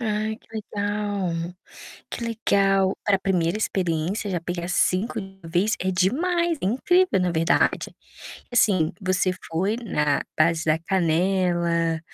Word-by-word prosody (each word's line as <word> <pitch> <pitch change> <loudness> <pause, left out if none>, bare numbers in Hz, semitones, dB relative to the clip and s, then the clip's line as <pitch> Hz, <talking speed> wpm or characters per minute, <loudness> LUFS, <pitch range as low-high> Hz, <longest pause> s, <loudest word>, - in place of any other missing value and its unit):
Ai, 215 -1 -1
que - - -26
legal! 205 -5 -3 0.6
Que 235 - -4
legal, 195 -4 +2
para 200 -2 +3
1º 180 0 0
experiência 185 +1 -1
já 175 -2 -1
pegar 175 0 -4
5 200 +6 +1
de 195 - -8
uma 170 -3 -12
vez 185 +7 +1
é 190 +1 -1
demais, 330 - +1
é - - -1
incrível, 355 - +2
na 180 -1 +1
verdade. 165 0 +1 0.6
Assim, 195 -9 +3
você 185 -1 +1 0.2
foi 190 +7 0
na 150 - 0 0.2
base 165 +1 +3
da 155 0 +2
canela, 170 -1 +1
190 Hz, 135 wpm, -24 LUFS, 170-210 Hz, 0.6 s, para